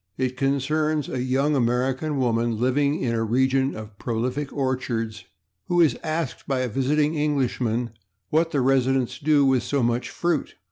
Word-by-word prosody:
It 130 -1 -1
concerns 150 +3 0
a 125 - -2
young 135 +4 +1
American 130 +4 0
woman 115 -3 +1
living 140 +4 +1
in 120 -2 0
a 115 -1 0
region 130 +4 +1
of 110 -2 -10
prolific 125 +5 -2
orchards 125 -5 -2 0.4
who 175 - +1
is 155 -8 +4
asked 155 -3 -3
by 135 -2 0
a 130 - 0
visiting 145 +6 +1
Englishman 130 -6 0 0.4
what 165 +2 +2
the 145 -4 0
residents 130 -1 +1
do 145 -1 +3
with 130 -2 +3
so 140 +2 -1
much 120 +1 0
fruit. 170 -4 -1
130 Hz, 155 wpm, -24 LUFS, 125-145 Hz, 0.4 s, is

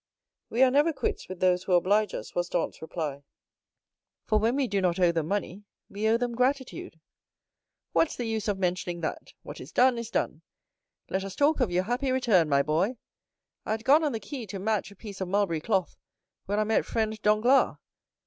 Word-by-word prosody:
"We 240 +4 +3
are 260 - +5
never 295 +5 +4
quits 265 -8 -3
with 185 -1 -8
those 180 -1 +3
who 185 - 0
oblige 200 +5 +3
us," - - -7
was 175 0 -1
Dantès' 175 - -2
reply; 155 -3 -4 1.0
"for 215 -1 +2
when 230 +4 +1
we 275 -2 +1
do 200 -2 0
not 180 -1 +1
owe 175 -2 +4
them 165 -2 -2
money, 200 0 -3 0.3
we 210 +2 -1
owe 225 +1 +4
them 240 0 -2
gratitude." 255 -8 -2 0.9
"What's 325 - +2
the 245 - -4
use 220 -1 -2
of 205 -2 0
mentioning 180 -2 -2
that? 160 - -5
What - - -9
is - - -10
done 250 -1 +3
is 235 -1 -6
done. - - -2 0.7
Let 190 0 -1
us 195 -1 -7
talk 295 +2 +2
of 250 -6 +2
your 180 +1 +1
happy 250 +6 -1
return, 215 -11 +3
my 140 -1 +3
boy. 170 - 0 0.7
I - - -4
had 220 0 -4
gone 300 +4 +5
on 300 - +1
the 225 - -2
quay 225 +3 -7
to 195 - -6
match 210 +1 -1
a 200 - -15
piece 200 -1 -9
of 190 - -2
mulberry 185 -4 0
cloth, 190 -2 -1 0.5
when 205 +2 -1
I 215 - +3
met 220 +1 +1
friend 220 -1 -2
Danglars. 215 +6 +3
210 Hz, 205 wpm, -27 LUFS, 180-240 Hz, 1.0 s, are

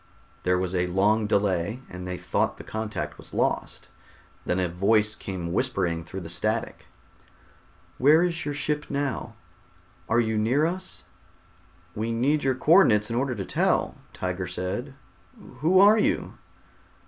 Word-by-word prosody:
There 90 0 +2
was 90 0 -2
a 90 -1 +1
long 105 +4 +2
delay 100 +1 0
and 90 0 -8
they 90 0 -4
thought - - -1
the - - -9
contact 110 -1 -5
was - - -12
lost. - - -1 0.6
Then 90 - +1
a 90 - +1
voice 105 +5 +2
came 90 -3 -5
whispering 95 -9 0
through 95 +4 -7
the 85 - -7
static. 110 +6 -2 1.1
"Where 150 +6 +6
is 175 -1 -1
your 145 -1 -3
ship 150 +1 -2
now? 140 -2 -3 0.7
Are 115 - +3
you 110 -2 +1
near 125 +8 +2
to 165 - +2
us?" 185 +1 -7 0.9
"We 110 +3 -2
need 140 +6 +1
your 130 -1 +1
co 145 - -1
ordinates 105 - +4
in - - -1
order 130 +1 0
to 100 -3 -4
tell," - - +1 0.2
Tiger 90 0 -3
said. 95 +10 -4 0.6
"Who 180 +5 +4
are 210 +3 +7
you?" - - 0
110 Hz, 155 wpm, -26 LUFS, 90-140 Hz, 1.1 s, are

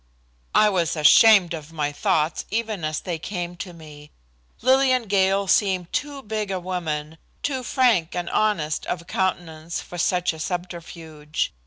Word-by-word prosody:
I 215 - +6
was 175 -5 0
ashamed 180 +4 +6
of 155 -1 -7
my 150 -2 -2
thoughts 155 +2 0
even 220 -4 -2
as 155 -1 -2
they 170 -3 -4
came 175 0 -5
to 180 - -6
me. 150 -3 -13 0.5
Lillian 260 -1 +4
Gale 195 -1 +2
seemed 185 -3 +1
too 285 -2 -3
big 215 -1 -3
a 190 -1 -2
woman, 160 -4 -4 0.2
too 270 -3 -1
frank 235 - +2
and 175 -1 -3
honest 170 -9 0
of 170 -1 -3
countenance 170 -3 -2
for 175 - -8
such 180 0 +1
a 160 - -10
subterfuge. 165 -3 -5
175 Hz, 150 wpm, -23 LUFS, 160-205 Hz, 0.5 s, I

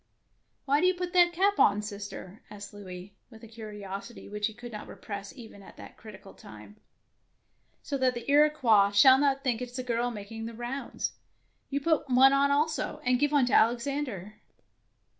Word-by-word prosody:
Why 280 +2 +2
do 365 - +4
you 370 - +2
put 355 0 -5
that 350 -1 +5
cap 390 +4 +1
on, 205 +1 +4
sister? 205 -1 -8
" - - -31
asked 205 -1 -10
Louis, 190 -1 -10 0.2
with 225 -1 -16
a - - -10
curiosity 210 -1 -9
which 210 0 -2
he 220 - -9
could 240 +1 -10
not 210 -1 -8
repress 200 -1 -8
even 220 -4 -12
at 195 - -15
that - - -12
critical 210 -3 -13
time. 105 -1 -14 0.5
" - - -44
So 280 -1 -3
that 255 -1 +1
the 240 - -7
Iroquois 280 -9 +4
shall 260 +6 +7
not 275 -1 +1
think 245 -4 0
that 250 - -4
it 245 - -15
is - - -7
a 255 - -3
girl 240 0 -1
making 225 0 -7
the 230 - -9
rounds. 245 +4 -4 0.6
You 280 0 -2
put 315 -2 0
one 260 +2 +6
on 280 +1 +3
also, 300 +3 -1
and 250 0 +2
give 290 0 +1
one 285 -4 +3
to 245 - -2
Alex 235 +1 +3
ander. 225 -8 -5
240 Hz, 200 wpm, -28 LUFS, 205-275 Hz, 0.6 s, shall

